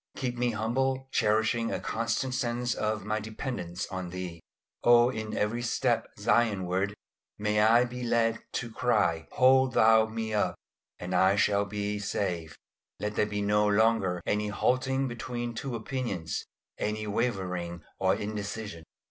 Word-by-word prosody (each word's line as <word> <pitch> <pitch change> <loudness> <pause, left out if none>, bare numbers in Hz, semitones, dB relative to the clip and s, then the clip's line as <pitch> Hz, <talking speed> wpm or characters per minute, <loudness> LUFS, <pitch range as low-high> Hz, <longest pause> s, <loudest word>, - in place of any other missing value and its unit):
Keep 125 -2 -2
me 125 0 +1
humble, 130 +4 -1
cherishing 110 +1 +2
a - - -1
constant 115 +3 -1
sense 120 -1 -1
of 110 -2 -2
my 110 0 0
dependence 105 -4 -4
on 95 -2 -4
Thee. 90 -2 -6 0.4
Oh 120 +1 +6
in 110 -3 -4
every 110 +3 0
step 120 - +1
Zionward, 100 -3 +1 0.4
may 105 0 +1
I 115 +3 +6
be 125 +1 -7
led 115 -1 +1
to 115 -2 -3
cry, 95 -10 +1
"Hold 130 0 +5
Thou 110 0 +6
me 110 0 -4
up, 105 - +1 0.4
and 90 +1 -5
I 95 +2 +4
shall 100 0 +2
be 105 0 -3
safe." 85 -6 -3 0.4
Let 105 0 -3
there 105 - +2
be 105 -1 -2
no 105 +1 +3
longer 100 -4 +2
any 105 0 0
halting 130 +5 +1
between 120 0 -4
two 125 +2 -4
opinions, 110 - -3 0.3
any 110 0 -2
wavering 90 -6 -2 0.2
or 95 0 +3
indecision. 105 -4 -5
110 Hz, 145 wpm, -29 LUFS, 100-120 Hz, 0.4 s, Oh